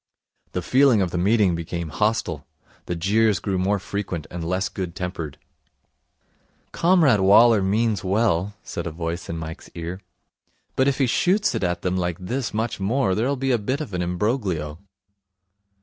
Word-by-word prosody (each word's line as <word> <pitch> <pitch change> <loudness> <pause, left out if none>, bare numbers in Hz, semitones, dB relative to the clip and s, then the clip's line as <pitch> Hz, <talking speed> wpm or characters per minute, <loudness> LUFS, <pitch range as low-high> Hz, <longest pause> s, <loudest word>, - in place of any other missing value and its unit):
The 90 - -2
feeling 130 +1 +4
of 90 -3 0
the 90 - -1
meeting 100 0 +3
became 85 0 -4
hostile. 85 -5 -1 0.4
The 85 - -2
jeers 105 +4 +2
grew 95 +1 -2
more 100 +3 +1
frequent 95 -3 -4
and 85 -1 -5
less 90 +4 0
good 90 -4 -5
tempered. 90 -5 -5 1.3
'Comrade 165 - +4
Waller 105 +3 +6
means 105 +1 +1
well,' 100 -1 +1
said - - -5
a - - -3
voice 85 +1 -4
in 85 - -3
Mike's 80 +1 -7
ear, 85 +3 -5 0.7
'but 130 - +3
if 140 - +1
he 135 - +3
shoots 190 - +2
it - - -2
at 90 -1 -1
them 90 0 0
like 90 -2 -1
this 120 +7 -3
much 110 +1 -2
more 100 0 +1
there'll 120 +8 0
be 135 0 -1
a 120 - +2
bit 130 +7 -2
of 150 -10 -6
an 90 - -1
imbroglio.' 90 - -1
95 Hz, 165 wpm, -23 LUFS, 85-115 Hz, 1.3 s, Waller